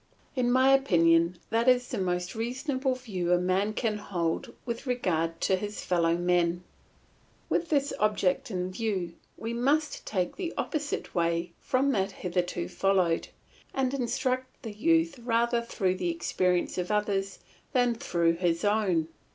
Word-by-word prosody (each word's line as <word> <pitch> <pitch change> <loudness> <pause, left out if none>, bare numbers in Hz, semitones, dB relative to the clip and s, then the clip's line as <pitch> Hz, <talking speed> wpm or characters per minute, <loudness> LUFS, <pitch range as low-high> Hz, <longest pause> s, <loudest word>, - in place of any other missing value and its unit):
In 245 -2 +2
my 260 +2 +5
opinion 170 -9 +4
that 230 +2 +1
is 250 -1 +3
the - - -3
most 180 -1 -1
reasonable 260 +3 -1
view 190 -9 -3
a 180 - +5
man 185 +4 +1
can 215 -2 -1
hold 175 -5 -2
with 235 +2 -4
regard 165 -9 0
to 190 - +3
his 205 +2 -5
fellow 170 -2 +2
men. 175 0 +1 0.9
With 335 - 0
this 285 -2 +1
object 210 -3 +1
in 185 -2 -2
view 190 -5 -2 0.2
we 225 +1 -4
must 285 +6 +1
take 185 -4 -2
the 360 -3 -4
opposite 295 -2 -3
way 170 0 0
from 270 +2 +1
that 195 -5 0
hitherto 175 -1 -2
followed, 185 -4 +1 0.5
and 265 -1 +1
instruct 255 0 -2
the 225 - -5
youth 325 +4 +2
rather 235 0 +1
through 190 -5 -1
the 180 -2 -1
experience 175 +2 0
of 180 - -2
others 200 -2 0 0.3
than 245 -2 +3
through 170 -7 +1
his 170 0 0
own. 200 -6 +2
205 Hz, 150 wpm, -28 LUFS, 180-250 Hz, 0.9 s, my